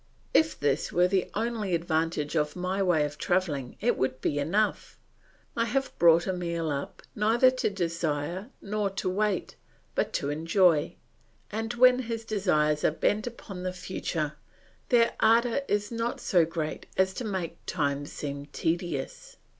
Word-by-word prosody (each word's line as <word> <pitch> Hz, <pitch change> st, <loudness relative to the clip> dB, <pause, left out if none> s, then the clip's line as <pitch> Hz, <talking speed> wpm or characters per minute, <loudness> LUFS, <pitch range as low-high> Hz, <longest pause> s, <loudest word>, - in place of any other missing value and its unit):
If 315 Hz, 0 st, +3 dB
this 145 Hz, -1 st, 0 dB
were 180 Hz, +1 st, +4 dB
the 190 Hz, -1 st, 0 dB
only 220 Hz, -4 st, -1 dB
advantage 165 Hz, -2 st, -1 dB
of 150 Hz, -1 st, 0 dB
my 185 Hz, +2 st, -1 dB
way 175 Hz, -6 st, +3 dB
of 150 Hz, 0 st, -7 dB
travelling 155 Hz, -9 st, -1 dB
it 240 Hz, +3 st, +1 dB
would 130 Hz, 0 st, 0 dB
be 145 Hz, +2 st, 0 dB
enough. 200 Hz, +9 st, 0 dB, 0.6 s
I 230 Hz, -, +1 dB
have 270 Hz, +3 st, -1 dB
brought 170 Hz, +1 st, +6 dB
Emile 170 Hz, -3 st, -2 dB
up 140 Hz, 0 st, -5 dB
neither 230 Hz, +5 st, +4 dB
to 255 Hz, -3 st, 0 dB
desire 170 Hz, -, -2 dB
nor 210 Hz, 0 st, -1 dB
to 195 Hz, -1 st, -4 dB
wait, 200 Hz, 0 st, -1 dB, 0.4 s
but -, -, 0 dB
to 140 Hz, -, -1 dB
enjoy; 165 Hz, 0 st, +2 dB, 0.6 s
and 225 Hz, +2 st, -3 dB
when 250 Hz, +1 st, +6 dB
his 230 Hz, -2 st, -4 dB
desires 155 Hz, -8 st, +1 dB
are -, -, +5 dB
bent 210 Hz, +8 st, 0 dB
upon 205 Hz, -6 st, -8 dB
the 185 Hz, 0 st, -3 dB
future, 170 Hz, -4 st, -3 dB, 0.6 s
their 235 Hz, -2 st, +4 dB
ardour 235 Hz, +3 st, +4 dB
is 205 Hz, +1 st, 0 dB
not 230 Hz, +1 st, -2 dB
so 175 Hz, -4 st, +3 dB
great 160 Hz, -1 st, -4 dB
as 190 Hz, 0 st, +3 dB
to 250 Hz, -, -5 dB
make 190 Hz, -6 st, -4 dB
time 145 Hz, -4 st, -1 dB
seem 140 Hz, -1 st, -6 dB
tedious. 165 Hz, -3 st, -3 dB
180 Hz, 155 wpm, -28 LUFS, 155-215 Hz, 0.6 s, brought